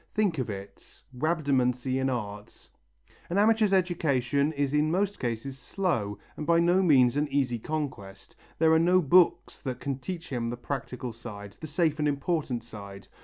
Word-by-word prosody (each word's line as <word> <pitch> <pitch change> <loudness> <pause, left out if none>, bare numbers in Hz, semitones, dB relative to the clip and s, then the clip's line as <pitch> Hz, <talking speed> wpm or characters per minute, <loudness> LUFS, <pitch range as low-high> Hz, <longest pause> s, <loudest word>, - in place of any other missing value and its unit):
Think 200 -8 +1
of 125 - -2
it, 100 -1 -9
rhabdomancy 130 -4 +1
in 135 - +1
art! 105 -4 -6 0.6
An 175 - -1
amateur's 215 0 +4
education 150 -7 +1
is 145 -1 -1
in 150 +1 +3
most 200 +4 0
cases 125 +3 -4
slow 125 - -2 0.2
and 150 - -6
by 170 0 +5
no 175 +2 +4
means 130 -8 +5
an 150 +1 +1
easy 135 -4 0
conquest. 110 -10 -5 0.2
There 160 0 +4
are 160 - +5
no 180 +2 +4
books 175 +2 +3
that 125 -2 -5
can 140 -2 -3
teach 165 +5 -6
him 120 -3 -2
the 120 - -4
practical 125 -1 -5
side, 105 -3 -9
the 155 - -5
safe 155 0 0
and 150 - +2
important 140 -4 -1
side. 100 -4 -10
140 Hz, 170 wpm, -28 LUFS, 120-165 Hz, 0.6 s, by